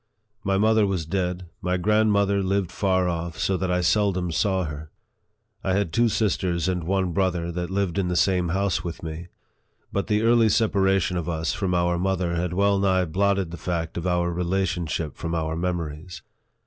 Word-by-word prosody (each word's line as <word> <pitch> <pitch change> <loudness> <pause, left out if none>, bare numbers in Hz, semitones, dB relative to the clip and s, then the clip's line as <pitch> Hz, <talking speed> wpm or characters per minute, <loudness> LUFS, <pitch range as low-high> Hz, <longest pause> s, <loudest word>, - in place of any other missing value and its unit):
My 95 -1 +1
mother 110 0 +3
was 95 -5 -2
dead, 90 +1 -2 0.2
my 90 +1 0
grand 105 +4 +3
mother 100 -1 +2
lived 95 -1 0
far 95 -2 +1
off, 85 -1 -3
so 95 - 0
that 95 0 -2
I 90 0 +1
seldom 90 -1 +1
saw 95 +4 +1
her. 75 -1 -6 0.7
I 95 - 0
had 100 -4 0
two 115 0 +3
sisters 95 -6 0
and 90 -3 -1
one 95 0 0
brother, 90 -2 0
that 90 0 -4
lived 95 -2 -1
in 95 - 0
the 90 - -1
same 90 -1 +2
house 95 -2 0
with 85 -1 -6
me; 80 +2 -6 0.7
but 100 - -1
the 105 0 +1
early 115 -1 +4
separation 95 -4 +2
of 85 -1 -3
us 80 -1 -1
from 95 -3 -1
our 85 0 +1
mother 90 -2 0
had 85 0 -1
well 100 +1 +2
nigh 95 -2 +2
blotted 95 +1 0
the 85 - -6
fact 85 -1 -3
of 85 +1 -3
our 85 -1 +1
rela 90 +2 0
tionship 85 -4 -2
from 85 0 -3
our 80 -1 -1
memories. 85 -1 -4
90 Hz, 190 wpm, -24 LUFS, 85-100 Hz, 0.7 s, early